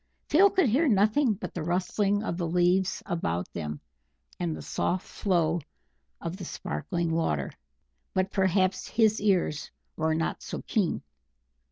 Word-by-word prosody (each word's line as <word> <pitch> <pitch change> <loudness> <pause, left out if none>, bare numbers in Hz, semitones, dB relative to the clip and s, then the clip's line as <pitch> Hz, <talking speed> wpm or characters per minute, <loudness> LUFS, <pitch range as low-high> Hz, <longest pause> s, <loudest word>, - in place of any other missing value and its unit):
Phil 385 +7 +6
could 375 -6 +3
hear 275 +9 +3
nothing 215 +2 +3
but 205 - -7
the 175 - -4
rustling 195 +5 0
of 170 - -2
the 170 -1 -2
leaves 180 +2 +2
about 90 - -2
them, 75 -3 -4 0.6
and 170 -3 -1
the - - -7
soft 185 +1 -1
flow 170 -4 0 0.6
of 170 +2 -5
the 190 - -7
sparkling 170 0 -3
water; 75 - 0 0.6
but 190 +1 +1
perhaps 190 -1 +1
his 220 -2 +3
ears 180 -7 +1 0.3
were 160 0 +1
not 165 +1 -1
so - - -6
keen. 200 -7 0
185 Hz, 145 wpm, -28 LUFS, 165-205 Hz, 0.6 s, Phil